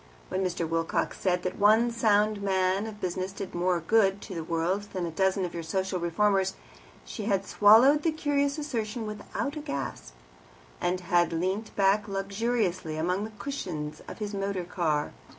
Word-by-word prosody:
When 190 - -1
Mr. 175 -2 -1
Wilcox 165 0 -1
said 180 -2 +1
that 185 - -3
one 220 +4 +5
sound 215 -2 +2
man 190 +1 +1
of 210 -1 -8
business 185 +1 -2
did 195 0 -7
more 175 0 +1
good 195 +2 +3
to 200 - -7
the 165 -2 -4
world 170 +5 -1
than 185 -2 -2
a 170 - -4
dozen 190 +2 +1
of 175 - -6
your 170 - -4
social 185 +3 -2
reformers, 190 +3 +1 0.5
she 210 - -6
had 195 -3 +1
swallowed 230 +10 +6
the 330 - +1
curious 285 -2 0
assertion 235 -6 -3
without 215 +7 -4
a - - -4
gasp, 95 - -5 0.7
and 180 +1 0
had 175 -1 +2
leant 185 +6 -2
back 200 +2 +3
luxuriously 195 -4 -1
among 180 +6 0
the 220 - -8
cushions 155 - -5
of - - -8
his 210 -1 -4
motor 195 -2 -2
car. 160 -5 -1
195 Hz, 170 wpm, -28 LUFS, 175-215 Hz, 0.7 s, swallowed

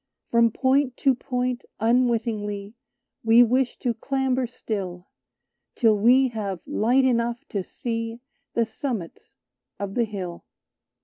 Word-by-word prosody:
From 235 0 +5
point 260 +2 +1
to 270 -2 +3
point 250 -1 -2 0.2
unwittingly 225 -3 0 0.5
We 230 +2 +7
wish 250 +1 +1
to 245 - -1
clamber 260 +1 -1
still, 190 -6 -5 0.7
Till 225 -4 +4
we 250 +5 +5
have 205 -6 -4
light 250 +5 +2
enough 235 -1 0
to 200 - -2
see 230 +3 -4 0.4
The 235 - +3
summits 220 - -6 0.4
of 200 -1 -4
the 235 +1 +2
hill. 185 -5 -6
235 Hz, 120 wpm, -25 LUFS, 210-250 Hz, 0.7 s, We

